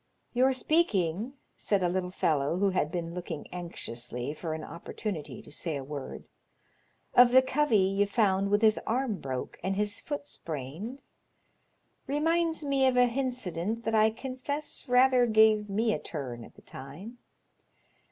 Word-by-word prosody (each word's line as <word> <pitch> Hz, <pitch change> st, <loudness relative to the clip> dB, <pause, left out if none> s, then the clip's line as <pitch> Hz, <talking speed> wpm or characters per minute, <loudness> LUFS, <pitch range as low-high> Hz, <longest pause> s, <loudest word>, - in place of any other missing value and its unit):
Your 255 Hz, +2 st, +4 dB
speaking," 235 Hz, -, +1 dB, 0.2 s
said 200 Hz, -3 st, +1 dB
a -, -, +3 dB
little 180 Hz, +1 st, -1 dB
fellow 155 Hz, -3 st, +1 dB
who 200 Hz, +1 st, +2 dB
had 155 Hz, -5 st, 0 dB
been 170 Hz, -1 st, -3 dB
looking 170 Hz, -3 st, -5 dB
anxiously 125 Hz, -7 st, -5 dB
for 155 Hz, 0 st, -4 dB
an 160 Hz, -, -6 dB
opportunity 170 Hz, +1 st, -6 dB
to -, -, -14 dB
say 155 Hz, 0 st, -2 dB
a 135 Hz, -, -5 dB
word, 140 Hz, 0 st, -7 dB, 0.5 s
" -, -, -40 dB
of 245 Hz, 0 st, +8 dB
(he 260 Hz, +1 st, +7 dB
covey 260 Hz, -3 st, +2 dB
ye 195 Hz, +1 st, +3 dB
found 200 Hz, -2 st, +2 dB
with 205 Hz, +2 st, +2 dB
his 215 Hz, -1 st, +5 dB
arm 235 Hz, -3 st, 0 dB
broke 130 Hz, -2 st, -5 dB
and 190 Hz, +1 st, -1 dB
his 205 Hz, +1 st, -1 dB
foot 290 Hz, -1 st, -5 dB
sprained, 165 Hz, -, -6 dB, 1.0 s
reminds 320 Hz, +2 st, +1 dB
me 275 Hz, -1 st, +3 dB
of 255 Hz, -1 st, +2 dB
an 245 Hz, 0 st, +5 dB
hincident 230 Hz, -5 st, -2 dB
that 225 Hz, -, -1 dB
I 215 Hz, 0 st, +5 dB
confess 265 Hz, +5 st, -4 dB
rather 250 Hz, 0 st, +5 dB
gave 215 Hz, -1 st, +4 dB
me 220 Hz, +3 st, +1 dB
a -, -, -2 dB
turn 130 Hz, -6 st, -6 dB
at -, -, -14 dB
the -, -, -18 dB
time. 175 Hz, -, -10 dB
205 Hz, 160 wpm, -29 LUFS, 165-250 Hz, 1.0 s, of